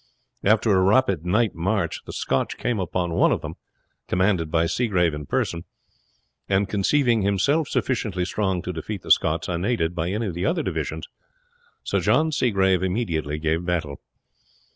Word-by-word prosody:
After 110 +2 +3
a 95 - +4
rapid 95 -4 +2
night 110 +4 +2
march 90 +1 -1
the - - -7
Scotch 65 - -1
came 120 -4 -1
upon 90 -2 -2
one - - +3
of - - 0
them, - - -6 0.5
commanded 90 -3 +1
by 80 +1 +2
Seagrave 90 -5 +1
in 75 -1 -6
person; 85 0 -1 0.9
and 100 0 +2
conceiving 115 +4 +2
himself 100 - +1
sufficiently 105 -8 -1
strong 95 -2 -1
to 90 - -4
defeat 95 +4 -6
the - - -2
Scots 80 +1 +3
unaided 85 -1 -1
by 85 0 -2
any 105 +4 -2
of 95 - -3
the 90 +2 -4
other 170 -1 0
divisions, - - -3 0.8
Sir - - 0
John 160 0 +2
Seagrave 95 - +2
immediately 85 -7 -1
gave 80 +2 -1
battle. 80 -6 -3
95 Hz, 160 wpm, -24 LUFS, 85-110 Hz, 0.9 s, a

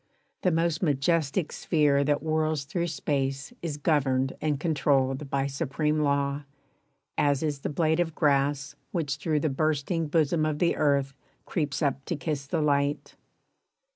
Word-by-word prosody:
The 185 - +3
most 165 -1 +1
majestic 155 +1 +1
sphere 145 -4 +2
That 145 0 +1
whirls 155 -2 0
through 170 +5 -2
space 140 - -2
is 155 -4 -3
governed 135 -4 +1
and 150 -3 0
controlled 140 -3 +1
By 140 0 0
supreme 150 +2 -1
law, 140 -1 +1 0.8
as 145 0 +2
is 150 -3 -1
the - - -3
blade 160 +2 +1
of 165 -2 0
grass 140 -1 +1 0.2
Which 150 -6 -1
through 150 0 0
the 155 - +1
bursting 155 +3 0
bosom 155 0 +2
of 155 -1 0
the 170 +2 +2
earth 140 -2 +1 0.3
Creeps 150 -3 -2
up 140 -1 0
to 170 - -2
kiss 140 -1 -3
the 160 +2 0
light. 145 0 0
145 Hz, 150 wpm, -27 LUFS, 140-160 Hz, 0.8 s, The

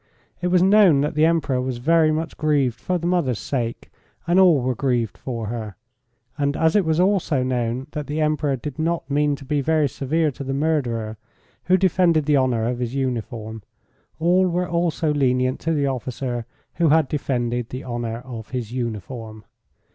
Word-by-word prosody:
It 180 - 0
was 180 0 +4
known 190 -7 +6
that 150 +3 -1
the 155 +1 +3
Emperor 145 -6 +1
was 130 -1 -3
very 160 +4 +3
much 160 +1 -3
grieved 145 -6 +1
for 180 - 0
the 170 - -5
mother's 170 - +1
sake, 120 -3 -4 0.3
and 175 +3 +3
all 175 -6 +6
were 130 0 0
grieved 120 -3 -1
for 115 -4 -5
her, 110 -2 -5 0.6
and 140 0 0
as 160 +2 +2
it 205 - +4
was 160 +1 +1
also 180 -8 +2
known 125 0 -1
that 150 -1 -5
the 150 +1 -3
Emperor 150 -2 +1
did 130 +3 -7
not 165 +1 -1
mean 145 0 +2
to 140 - -12
be 145 +1 0
very 155 +1 +2
severe 150 +4 0
to 140 - -8
the 135 0 -3
murderer, 120 -8 -1 0.5
who 185 +1 +4
defended 175 -4 +3
the 150 0 +3
honour 125 -4 +1
of 125 0 -2
his 125 +1 -3
uniform, 115 -4 -3 0.6
all 180 +3 +3
were 180 +1 -1
also 170 -2 0
lenient 130 -2 +1
to 165 - -2
the 145 -3 +1
officer 125 -2 -3 0.3
who 170 -2 +3
had 155 -1 +4
defended 120 -4 -2
the 130 - -6
honour 120 -1 -4
of 115 -4 -8
his 120 -4 -4
uniform. 110 -2 -5
140 Hz, 185 wpm, -22 LUFS, 120-160 Hz, 0.6 s, known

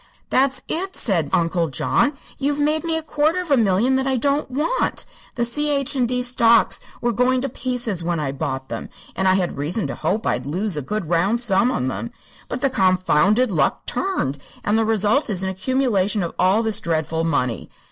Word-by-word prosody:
"That's 265 +1 +2
it!" 375 +3 -3
said 170 - +1
Uncle 170 0 +1
John. 155 - +1 0.3
"You've 285 +1 0
made 300 +2 +1
me 325 -1 0
a 320 - -3
quarter 310 +3 +1
of 355 -4 -5
a - - +7
million 230 +3 +2
that 265 0 -1
I 265 -1 +1
don't 280 +3 0
want. 300 - -1 0.3
The 240 - 0
C.H. 280 +2 0
& 240 - +3
D. 250 +1 -1
stocks 235 -2 +3 0.2
were 240 - +1
going 250 +3 +2
to 275 - -1
pieces 240 -7 -2
when 170 -1 -1
I 145 -3 -1
bought 135 -2 -4
them, - - -5 0.3
and 190 - 0
I 185 - +5
had 180 -6 -1
reason 170 +9 -2
to - - -3
hope 215 +4 -2
I'd - - -1
lose 185 +5 -1
a 150 - -2
good 210 +5 -3
round 180 +8 +1
sum 230 0 +2
on 230 - -1
them. 235 - -4 0.4
But 250 - -4
the 275 - +2
confounded 190 +3 +3
luck 165 - 0
turned, 255 - -1 0.2
and 205 - +1
the 225 0 +2
result 220 +5 +2
is 190 -3 -1
an 190 - -1
accumulation 205 -1 0
of 170 - -4
all 195 +5 +3
this 220 -2 0
dreadful 160 0 -1
money. 135 -7 -1
220 Hz, 200 wpm, -21 LUFS, 180-265 Hz, 0.4 s, a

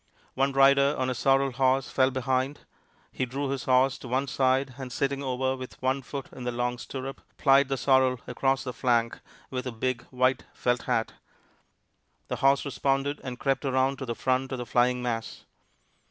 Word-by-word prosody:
One 135 +1 +1
rider 140 +1 +5
on 130 0 0
a - - 0
sorrel 135 +2 +2
horse 130 +1 +1
fell 130 -1 +3
behind. 130 +2 -1 0.5
He 130 - -2
drew 135 +3 -3
his 135 -2 -3
horse 130 +1 +3
to - - -9
one 130 +3 0
side, 130 0 +1
and 130 -2 -6
sitting 140 +2 -1
over 130 0 -1
with 130 -1 -9
one 130 +1 0
foot 140 +1 -6
in 130 - -8
the 125 - -1
long 120 0 -2
stirrup, 135 +1 -6 0.2
plied 135 -1 +5
the 135 - 0
sorrel 130 -2 +3
across 135 +1 0
the 125 - -5
flank 120 -2 +1 0.3
with 130 0 -3
a - - -3
big, 120 +1 -2
white 130 0 +1
felt 125 0 0
hat. 115 - 0 1.2
The - - -2
horse 135 +1 +3
responded, 140 +1 -1
and 125 -2 -5
crept 135 +2 0
around 135 0 +1
to 135 - -5
the 115 - -2
front 130 +1 0
of 130 - -2
the 125 - -5
flying 125 +2 +2
mass. 115 -2 -4
130 Hz, 185 wpm, -27 LUFS, 125-135 Hz, 1.2 s, rider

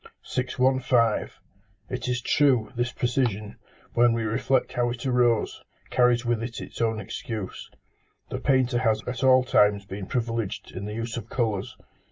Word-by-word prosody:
615. 125 -2 +1 0.6
It - - -3
is 125 0 -1
true, 135 -6 +3
this 120 +1 -1
precision, 120 -5 -1 0.4
when 120 0 +4
we 115 -1 -1
reflect 125 +4 0
how 120 0 +1
it 120 +2 -5
arose, 125 -3 +2 0.3
carries 125 -1 +3
with 120 -1 0
it 115 +1 -5
its - - -7
own 115 -1 +1
excuse. 110 -3 -6 0.6
The - - -3
painter 130 -3 +2
has 110 -4 +1
at 125 +2 -4
all 130 -1 +6
times 105 -5 +3
been 95 -1 -6
privileged 115 -4 -2
in 95 +2 -6
the 105 +1 -5
use 115 0 -4
of 115 - -7
colours. 110 -6 -2
120 Hz, 155 wpm, -26 LUFS, 110-125 Hz, 0.6 s, all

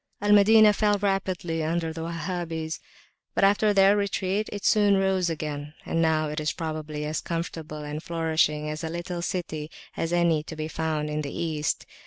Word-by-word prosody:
Al 205 +1 +1
Madinah 210 +1 +7
fell 205 0 +2
rapidly 185 -5 -1
under 165 0 -1
the 165 - -6
Wahhabis, 165 -1 -4 0.6
but - - +2
after 205 +2 +4
their 195 0 +5
retreat, 200 0 -1
it 205 - -6
soon 205 -2 +4
rose 190 -2 +1
again, 150 -1 -5
and 165 - 0
now 160 -1 +2
it 150 +1 -3
is 155 0 -1
probably 155 -2 -4
as 155 +1 -2
comfortable 160 -2 -5
and 150 +1 -5
flourishing 160 -2 0
a 155 +1 -4
little 175 +1 -4
city 160 -4 -3 0.3
as 165 - -2
any 170 -3 +3
to 160 +1 -9
be 155 0 -3
found 155 -1 -2
in 150 0 -1
the 145 - -4
East. 155 -3 -2
165 Hz, 175 wpm, -26 LUFS, 155-190 Hz, 0.6 s, Madinah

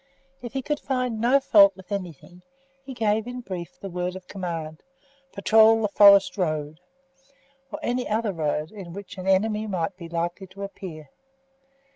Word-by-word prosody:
If 240 0 -8
he 270 -1 -3
could 295 +2 -2
find 250 -4 -2
no 250 +4 +4
fault 200 -7 +6
with 190 +1 -16
anything, 180 -2 -6 0.4
he 270 - -9
gave 220 -1 0
in 250 0 -6
brief 180 -6 -7
the 195 - -7
word 180 +1 -3
of 185 -1 -10
command, 165 -4 -5 0.5
"Patrol 220 +2 +4
the 210 - +1
forest 200 0 +6
road," 155 -3 -2 0.9
or - - -4
any 245 +1 -1
other 215 -1 0
road 155 0 -2
on 180 -5 -9
which 200 0 -9
an 185 - -6
enemy 210 +3 +1
might 185 -2 -2
be 170 -3 -9
likely 175 +3 -3
to 195 +2 -10
appear. 165 -7 -9
195 Hz, 165 wpm, -25 LUFS, 175-220 Hz, 0.9 s, fault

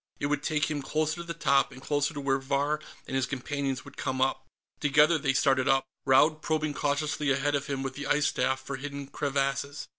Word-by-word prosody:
It - - -1
would 145 0 0
take 150 -2 +1
him 145 -2 -2
closer 155 +3 -1
to 170 - -5
the 170 -1 -6
top, 140 -3 +3
and 130 - -11
closer 145 +2 0
to - - -3
where 135 -1 +1
Vahr 140 +3 0 0.2
and - - -5
his 130 -1 +1
companions 135 0 -3
would - - -13
come 130 0 -2
up. 135 +1 0 0.3
Together, 150 +3 +4
they 135 -2 +1
started 135 -1 +2
up, 135 -1 +3 0.2
Raud 150 +4 +5
probing 155 -1 0
cautiously 145 0 -1
ahead 135 +2 +1
of 140 0 -1
him 135 -2 -2
with 135 -1 -3
the 140 +1 -5
ice 150 0 +2
staff 130 -2 +1
for 135 0 -5
hidden 140 0 -6
crevasses. 140 0 -2
140 Hz, 215 wpm, -28 LUFS, 135-150 Hz, 0.3 s, Raud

